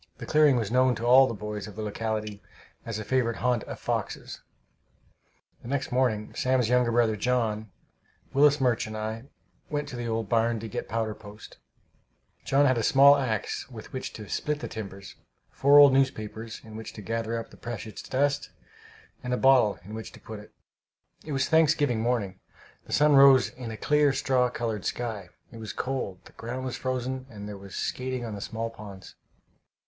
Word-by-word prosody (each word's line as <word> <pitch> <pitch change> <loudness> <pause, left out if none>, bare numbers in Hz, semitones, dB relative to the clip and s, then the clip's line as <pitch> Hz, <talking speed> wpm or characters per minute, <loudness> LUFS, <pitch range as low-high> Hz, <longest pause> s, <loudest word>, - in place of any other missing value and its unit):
The - - -7
clearing 150 -3 +4
was 115 -3 -1
known 130 0 +3
to 115 - -5
all 130 +2 +7
the 115 - -3
boys 105 0 -5
of 105 - -11
the 110 - -5
locality 105 -1 -3 0.5
as 115 -2 -3
a 110 - -4
favorite 120 0 0
haunt 125 -3 0
of - - -8
foxes. - - -4 1.2
The - - -11
next 135 +1 -2
morning 125 -4 0
Sam's 130 -3 +1
younger 125 -1 +3
brother, 115 -2 +2
John, 110 -2 -1 0.6
Willis 145 +1 +5
Murch 120 -4 +1
and 110 0 -6
I 110 +2 -4 0.4
went 150 -1 -2
up - - -10
to - - -7
the 120 -1 -4
old 115 -1 -2
barn 115 +1 +1
to 115 - -5
get 105 - -5
powder 110 0 -1
post. 105 0 -13 0.8
John 140 +1 +3
had 130 -3 +3
a - - -1
small 140 +4 +7
axe 125 -3 -2
with 115 -4 -11
which 130 - -4
to 105 -2 -9
split 150 +7 -2
the - - -5
timbers, 100 -3 -8 0.3
four 140 +1 +5
old 145 -2 +9
newspapers 115 -4 -1
in 110 -1 -11
which 110 0 -7
to 105 - -9
gather 115 +1 -2
up 115 - -7
the - - -14
precious 110 -2 -7
dust, 140 +2 0 0.7
and 125 0 -1
a - - -3
bottle 130 -6 +4
in 105 +3 -10
which 110 0 -7
to - - -13
put 110 -2 -9
it. 105 - -14 0.7
It 155 - -7
was 135 -1 0
Thanksgiving 150 -7 +3
morning. 110 -6 -1 0.5
The - - -12
sun 150 0 +5
rose 135 -2 +7
in 125 -2 -8
a 110 - -6
clear, 150 +1 +3
straw 130 -2 +2
colored 115 -4 -3
sky. 110 -7 -4 0.2
It 115 - -11
was 110 -2 -6
cold; 125 -8 -4
the - - -15
ground 125 +3 -6
was 130 - -3
frozen, 130 0 -3
and 105 -3 -9
there 105 - -6
was 100 0 -10
skating 130 -1 -3
on 110 - -5
the 100 - -6
small 115 +2 -4
ponds. 100 -4 -11
115 Hz, 195 wpm, -27 LUFS, 110-130 Hz, 1.2 s, old